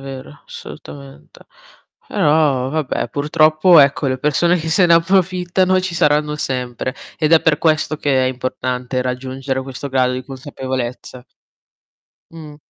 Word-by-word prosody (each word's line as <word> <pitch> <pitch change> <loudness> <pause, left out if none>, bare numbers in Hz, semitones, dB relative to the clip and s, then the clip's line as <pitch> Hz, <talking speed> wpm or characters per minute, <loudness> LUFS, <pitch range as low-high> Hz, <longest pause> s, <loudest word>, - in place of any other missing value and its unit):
vero, 135 +1 -10
assolutamente. 70 +1 -12 0.6
Però, 145 -4 +1
vabbè, 150 -5 -2
purtroppo 155 +4 +3
ecco 140 0 +2
le 130 0 -2
persone 170 +5 +1
che 160 -1 -4
se 180 +3 +3
ne 170 - +5
approfittano 185 +1 +1
ci 185 -2 -4
saranno 150 -1 +1
sempre 125 -2 -4 0.2
ed 155 +1 +1
è 160 - +7
per 155 -2 +2
questo 155 -1 0
che 135 -3 +1
è - - +1
importante 125 0 -3
raggiungere 130 +1 -4
questo 135 +1 -7
grado 130 -1 +1
di 130 0 -5
consapevolezza. 130 -2 -6 1.1
Mh. 155 -3 -11
140 Hz, 130 wpm, -18 LUFS, 130-160 Hz, 1.1 s, è